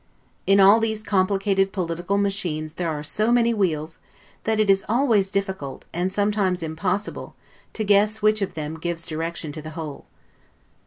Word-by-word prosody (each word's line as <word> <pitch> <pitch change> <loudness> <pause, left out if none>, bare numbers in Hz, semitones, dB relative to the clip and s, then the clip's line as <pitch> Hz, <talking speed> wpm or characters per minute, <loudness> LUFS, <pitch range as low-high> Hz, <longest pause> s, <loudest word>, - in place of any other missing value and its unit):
In 195 0 +5
all 200 +3 +7
these 220 -1 -2
complicated 195 -1 +1
political 175 +1 -2
machines 180 -7 -1
there 175 -2 -2
are 150 -2 -3
so 215 +9 0
many 235 -1 +3
wheels, 160 -6 -1 0.5
that 220 0 +1
it 215 - +3
is 195 0 +4
always 225 -5 +2
difficult, 190 -8 -3
and 180 +2 -1
sometimes 200 -3 0
im 160 0 -4
possible, 195 +5 -3 0.4
to 220 - -2
guess 210 +1 +3
which 215 0 +3
of 195 - -2
them 155 0 -5
gives 170 0 -3
direction 165 -1 -4
to 155 +1 -7
the 155 - -8
whole. 155 -3 -7
195 Hz, 165 wpm, -23 LUFS, 165-210 Hz, 0.5 s, all